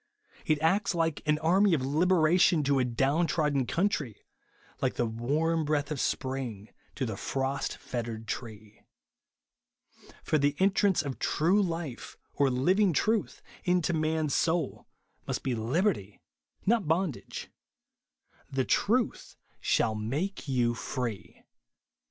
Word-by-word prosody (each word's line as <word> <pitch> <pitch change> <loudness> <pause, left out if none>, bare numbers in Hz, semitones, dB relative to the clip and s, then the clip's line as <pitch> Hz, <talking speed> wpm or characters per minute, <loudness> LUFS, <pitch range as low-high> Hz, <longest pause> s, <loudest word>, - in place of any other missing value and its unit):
It 155 -1 +2
acts 195 +3 +2
like 165 -2 0
an 150 0 +3
army 180 +4 +3
of 130 -4 -2
liberation 165 +2 +3
to 140 -1 +2
a - - +3
down 135 +7 +1
trodden 150 -6 +1
country; 165 - -1 0.6
like - - 0
the 120 - +1
warm 150 +9 0
breath 150 -1 -1
of 150 - -2
sjDring 125 -8 -3 0.3
to 135 - -1
the 110 -3 -3
frost 135 +6 -2
fettered 115 -2 -5
tree. 110 -3 -7 1.4
For 155 - +1
the 145 0 +2
entrance 195 -2 +3
of 140 -3 -5
true 180 +7 +2
life, 165 -9 -4 0.2
or 140 -1 +2
living 180 +10 +2
truth, 215 +7 0 0.2
into 180 -1 +1
man's 155 -2 0
soul, 170 0 0 0.4
must - - -3
be 130 - 0
liberty, 115 - -1 0.5
not 220 -4 +2
bondage. 165 -2 -2 1.0
•' - - -6
The 130 -1 +1
ivuth 235 +2 0 0.2
shall 110 - +1
make 140 - -3
you 120 -3 +1
free." 115 -6 -5
150 Hz, 130 wpm, -29 LUFS, 125-175 Hz, 1.4 s, an